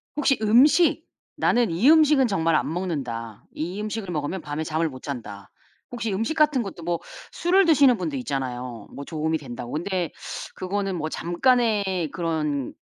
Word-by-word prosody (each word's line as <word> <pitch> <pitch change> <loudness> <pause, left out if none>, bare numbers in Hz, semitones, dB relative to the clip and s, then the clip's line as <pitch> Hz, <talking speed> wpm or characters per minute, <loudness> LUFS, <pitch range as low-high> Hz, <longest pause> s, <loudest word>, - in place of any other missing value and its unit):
혹시 280 -2 +2
음식 260 +10 +4 0.3
'나는 240 -4 +2
이 200 - +4
음식은 300 -4 +5
정말 165 -6 +1
안 140 +1 0
먹는다. 125 - -4
이 175 +6 -4
음식을 215 -2 -4
먹으면 155 +4 -3
밤에 150 0 -4
잠을 160 +1 -1
못 130 -2 -11
잔다.' 105 -8 -7 0.4
혹시 230 -3 -3
음식 225 +10 -1
같은 300 -5 +3
것도 185 -5 -8
뭐 170 0 -1 0.3
술을 370 +3 +3
드시는 280 -7 +5
분도 160 -5 -3
있잖아요 125 -4 -4
뭐 140 - -7
도움이 160 0 -1
된다고. 120 -4 -8
근데 175 +1 -2 0.4
그거는 195 0 -2
뭐 155 0 -3
'잠깐의 200 - +1
그런 155 -6 -2
175 Hz, 315 characters per minute, -24 LUFS, 145-230 Hz, 0.4 s, 음식은